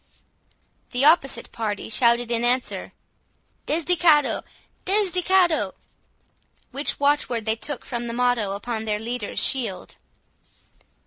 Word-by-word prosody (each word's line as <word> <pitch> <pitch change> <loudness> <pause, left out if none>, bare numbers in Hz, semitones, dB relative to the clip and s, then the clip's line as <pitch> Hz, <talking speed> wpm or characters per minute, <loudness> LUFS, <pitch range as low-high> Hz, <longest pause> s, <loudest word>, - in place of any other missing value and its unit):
The 250 +3 +2
opposite 275 -7 +3
party 215 -3 -4
shouted 235 +1 +2
in 235 0 0
answer—"Desdichado! 300 +5 -1 0.4
Desdichado!"—which 360 - -1
watch 285 +1 +2
word 230 -3 -3
they 220 0 +1
took 270 +4 -5
from 240 -1 -4
the 230 - -4
motto 240 -5 0
upon 220 +2 -4
their 210 -1 -1
leader's 225 0 -5
shield. 230 -9 0
245 Hz, 100 wpm, -23 LUFS, 225-295 Hz, 0.4 s, opposite